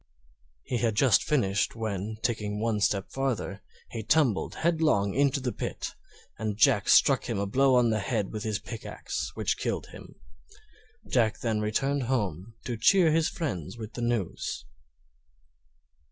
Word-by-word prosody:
He 125 - -2
had 115 -3 +1
just 120 -2 +4
finished, 100 -10 +1
when, 110 -1 -3
taking 105 -3 -1
one 110 -1 0
step 100 -1 0
farther, 105 -8 -2 0.3
he 115 - -4
tumbled 120 -1 +2
headlong 155 - +2
into 140 +1 +2
the 130 -2 -2
pit, - - -5 0.5
and 110 -2 -2
Jack 110 -1 +4
struck 135 -3 +5
him 115 - -1
a 100 - 0
blow 130 +6 +3
on 120 -2 +4
the 110 - +1
head 105 -2 -2
with 110 - -4
his 110 -2 -1
pickaxe 115 +1 -5
which - - -1
killed - - -2
him. - - -12 0.9
Jack 115 -4 +1
then 110 -3 0
returned 135 +7 0
home 105 - -2
to 120 -2 -3
cheer 175 - +5
his 160 0 +2
friends 115 - -4
with 110 -2 -8
the 120 - -5
news. 120 -6 -2
115 Hz, 155 wpm, -28 LUFS, 105-135 Hz, 0.9 s, struck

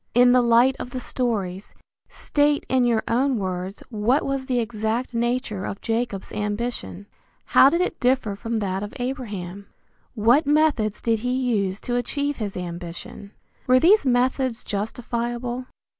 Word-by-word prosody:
In 245 0 +6
the 250 0 +5
light 240 +2 +4
of - - -5
the 255 - -5
stories, 205 -7 -3 0.3
state 290 0 +1
in 260 -1 +2
your 230 -2 +2
own 255 +2 +2
words 185 0 -4
what 225 +6 +1
was 275 -1 -2
the 250 - 0
exact 225 +2 -2
nature 235 -4 -1
of 195 - -5
Jacob's 225 -4 -2
ambition. 210 -1 -4 0.4
How 270 - +6
did 340 +4 +1
it 360 - -2
differ 250 -5 +1
from 230 +3 -3
that 195 -2 -2
of 205 - -6
Abraham? 205 -8 -5 0.5
What 240 +7 +4
methods 290 -9 +2
did 225 -2 +1
he 250 +3 -2
use 215 -7 0
to 245 0 -1
achieve 285 +4 -2
his 205 -4 -4
ambition? 175 +3 -7 0.3
Were 255 0 +6
these 390 +9 +5
methods 255 -1 +1
justifiable? 240 +3 -3
235 Hz, 150 wpm, -23 LUFS, 210-255 Hz, 0.5 s, In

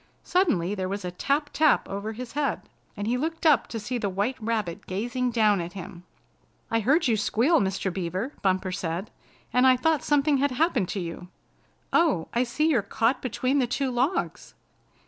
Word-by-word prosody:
Suddenly 215 - +1
there 190 -2 -3
was 200 -1 -4
a 180 - -3
tap, 285 - -1
tap 310 -2 +3
over 200 +3 -4
his 245 +1 -7
head, 285 -4 -1 0.3
and 205 - -3
he 240 +3 +1
looked 325 +3 -3
up 300 -5 +5
to 225 - -5
see 240 +4 -3
the 205 - -1
White 200 +7 -1
Rabbit 215 -6 -2
gazing 245 +6 -1
down 215 -5 +3
at 170 +1 -6
him. 180 -2 -9 0.7
"I 225 - +2
heard 280 - +3
you 230 - +3
squeal, 245 +9 +2
Mr. 190 -1 -1
Beaver," 185 - -3
Bumper 185 -1 +1
said, 180 +2 -4 0.4
"and 250 +2 +5
I 255 -1 +6
thought 315 +3 +1
something 290 0 +3
had 285 +2 +2
happened 255 - +1
to 200 - -2
you. 175 0 -6 0.7
Oh, 310 - +2
I 235 - +2
see 305 +6 0
you're 255 -9 +3
caught 230 +5 0
between 260 +2 0
the 250 - +1
two 265 +2 -1
logs!" 255 +9 -1
230 Hz, 185 wpm, -26 LUFS, 195-275 Hz, 0.7 s, I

